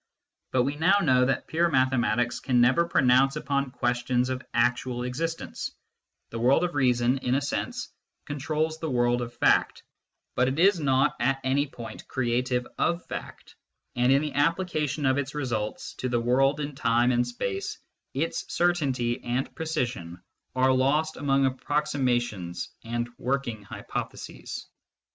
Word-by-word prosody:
But 130 -1 +3
we 140 +3 -2
now 175 +6 +4
know 130 -4 +4
that 135 - 0
pure 170 +2 +1
mathematics 120 -3 +1
can 125 -3 +1
never 130 +8 +4
pronounce 135 -2 +4
upon 140 -2 -1
questions 125 0 0
of 130 0 -3
actual 125 +1 +1
existence: 160 +7 -3 0.6
the 115 - -4
world 130 +8 +4
of 175 -1 -1
reason, 125 -1 +2
in 125 0 0
a 140 - +1
sense, 240 - -3 0.4
controls 155 +3 -2
the 160 - -3
world 120 -1 +2
of 120 0 -4
fact, 120 - +2 0.5
but 125 - +2
it 130 +2 -1
is 185 +1 +4
not 135 -3 +2
at 135 +3 +1
any 140 +3 +1
point 120 -4 -9
creative 125 0 0
of 170 +1 0
fact, - - -8 0.4
and 125 +1 +3
in 140 +2 +4
the 150 - -3
application 150 -1 0
of 130 +1 +3
its 140 +1 -4
results 120 -7 -3
to 130 - -1
the 120 -1 +1
world 135 +5 +2
in 145 0 -3
time 120 -2 +2
and 120 0 +2
space, 100 -5 -3 0.4
its 155 +5 -2
certainty 135 -9 +1
and 125 +3 -2
precision 125 - -3 0.4
are 130 0 +4
lost 150 +5 +2
among 135 -1 +2
approximations 130 - -1
and 120 +1 -2
working 125 -4 -2
hypotheses. 100 - -6
130 Hz, 150 wpm, -27 LUFS, 120-145 Hz, 0.6 s, now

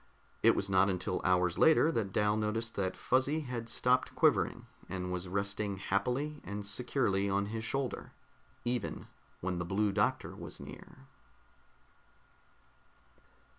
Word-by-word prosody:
It - - +6
was 100 - 0
not 95 0 +4
until 90 -1 -1
hours 90 -1 +2
later 160 0 +6
that 110 -9 -1
Dal 105 +2 +2
noticed 110 +2 -1
that 95 -2 -2
Fuzzy 135 +5 +1
had 120 -4 -5
stopped 125 +2 +1
quivering, - - +2 0.2
and 90 0 -3
was 90 0 -3
resting 100 +1 -2
happily 125 +10 -1
and 100 +1 -5
securely 100 -3 0
on 100 +1 +1
his 110 +2 -4
shoulder 135 +1 -3 0.5
even 120 -2 -2 0.4
when 90 -1 -2
the - - -1
Blue 100 +4 +1
Doctor - - 0
was - - -8
near. - - -11
100 Hz, 135 wpm, -32 LUFS, 95-125 Hz, 0.5 s, It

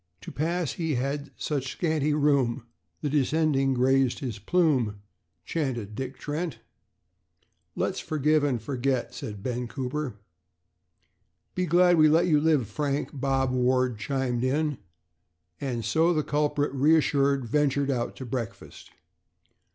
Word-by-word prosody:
"To - - -8
pass 165 +1 -1
he 160 -4 -2
had 140 +3 -2
such 135 -4 -2
scanty 155 -3 0
room, 140 -5 +2 0.4
The 150 - -1
descending 145 -2 +2
grazed 130 0 +3
his 120 -6 -5
plume," 125 - +1 0.5
chanted 125 -10 -3
Dick 130 +4 -5
Trent. 150 -2 -4 1.2
"Let's - - -1
forgive 155 0 +1
and 135 -5 +1
forget," 125 +1 -2
said 105 -5 -7
Ben 125 0 -2
Cooper. 130 0 -4 1.4
"Be 180 0 -1
glad 175 +1 +5
we 155 0 +7
let 165 +3 +4
you 155 -4 +3
live, 150 -7 +2
Frank," 140 +6 -2
Bob 135 -1 0
Ward 125 -2 +1
chimed 130 -1 -1
in; 145 +2 0 0.8
and 125 -5 -3
so 165 +2 +2
the 155 - +1
culprit, 145 -1 0
reassured, 140 -2 +3
ventured 140 +2 +1
out 120 -3 -2
to 130 - -7
breakfast. 115 -2 -6
140 Hz, 130 wpm, -27 LUFS, 125-150 Hz, 1.4 s, we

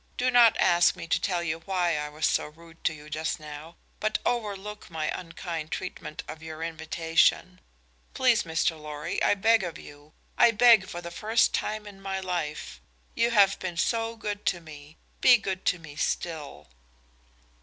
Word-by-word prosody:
Do 255 0 +1
not 235 -2 +6
ask 175 0 +4
me - - -7
to 165 - 0
tell 175 -3 0
you 160 -1 -2
why 175 -1 0
I 150 0 -3
was 155 +1 -2
so - - +1
rude 165 +2 -17
to 165 - +2
you 150 0 -13
just 155 +2 -3
now, 150 +2 -10 0.2
but 215 0 0
overlook 210 -3 -3
my 160 -2 -2
unkind 165 -2 -6
treatment 180 -4 -6
of 155 +1 -8
your 160 0 -7
invitation. 165 +2 +1 0.5
Please, 250 -3 +4
Mr. 160 -1 -1
Lorry, 150 +2 -4
I - - +4
beg 225 +3 +4
of 170 -3 -5
you 145 +2 -14 0.3
I 235 - +8
beg 230 -3 +6
for 175 - -6
the 170 - -7
first 220 +5 +2
time 215 0 -2
in 200 -1 -12
my 195 0 -3
life. 175 -5 -4 0.3
You 235 - +2
have 200 -4 +4
been 180 -2 -5
so 230 +4 0
good 210 -2 -5
to 175 - +1
me; 155 -2 -13 0.2
be 250 -1 +8
good 190 -3 -4
to 180 - +2
me 155 -3 -12
still." 150 - -3
175 Hz, 175 wpm, -27 LUFS, 155-205 Hz, 0.5 s, I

